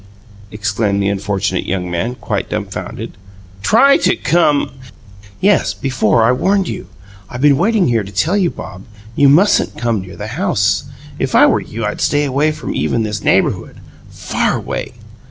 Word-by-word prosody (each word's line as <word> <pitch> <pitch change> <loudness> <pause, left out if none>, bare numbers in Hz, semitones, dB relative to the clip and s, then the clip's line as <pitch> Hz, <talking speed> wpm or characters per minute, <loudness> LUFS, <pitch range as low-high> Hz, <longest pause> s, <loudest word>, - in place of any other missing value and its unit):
exclaimed 105 -1 -1
the 100 - +1
unfortunate 100 -1 -1
young 90 -2 -2
man, 100 +9 -2
quite - - -3
dumfounded. - - -5 0.5
"TRY 270 - +5
to 185 - +2
come 150 0 +1 0.4
" - - -21 0.3
"Yes, 205 +2 +2
before 120 -4 +1
I 115 - +4
warned 190 +8 +1
you. - - -6 0.4
I've 120 - -6
been 145 -1 +5
waiting 205 -2 +2
here 115 -2 +1
to 100 - -10
tell 160 - 0
you, 190 -4 +2
Bob, 95 - -9 0.3
you 140 -1 +5
mustn't 185 +9 +3
come 115 -4 -1
near 95 0 -10
the 105 - -6
house 115 - 0 0.3
if - - -1
I - - +7
were - - +2
you 115 0 -5
I'd 105 - -3
stay 145 0 +2
away 140 +3 +1
from 155 - -5
even 115 - 0
this 105 -1 -3
neighbourhood - - +1 0.3
far - - -1
away! - - -5
120 Hz, 170 wpm, -16 LUFS, 105-160 Hz, 0.5 s, I